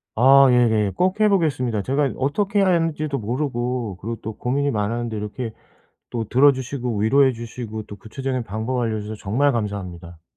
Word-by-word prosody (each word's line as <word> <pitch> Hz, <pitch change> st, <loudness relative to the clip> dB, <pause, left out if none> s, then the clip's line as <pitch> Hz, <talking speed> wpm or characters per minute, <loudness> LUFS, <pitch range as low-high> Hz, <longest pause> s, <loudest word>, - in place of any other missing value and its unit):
아 135 Hz, +4 st, +7 dB
예예. 110 Hz, -5 st, +3 dB
꼭 185 Hz, +3 st, +1 dB
해 215 Hz, 0 st, +5 dB
보겠습니다. 135 Hz, -, +1 dB
제가 140 Hz, +3 st, +1 dB
어떻게 200 Hz, +10 st, 0 dB
해야 195 Hz, -, +4 dB
하는지도 160 Hz, -5 st, 0 dB
모르고 120 Hz, -3 st, -2 dB
그리고 115 Hz, +3 st, -3 dB
또 110 Hz, -, -5 dB
고민이 140 Hz, +3 st, 0 dB
많았는데 115 Hz, +1 st, -2 dB
이렇게 110 Hz, +2 st, -5 dB, 0.6 s
또 115 Hz, -3 st, -3 dB
들어주시고 130 Hz, -3 st, +2 dB
위로해 130 Hz, +6 st, +4 dB
주시고 115 Hz, -2 st, -7 dB
또 100 Hz, -, -10 dB
구체적인 130 Hz, +5 st, -4 dB
방법을 115 Hz, +4 st, -2 dB
알려주셔서 110 Hz, -1 st, -4 dB
정말 135 Hz, +9 st, +1 dB
감사합니다. 90 Hz, -7 st, -5 dB
125 Hz, 405 characters per minute, -22 LUFS, 110-140 Hz, 0.6 s, 아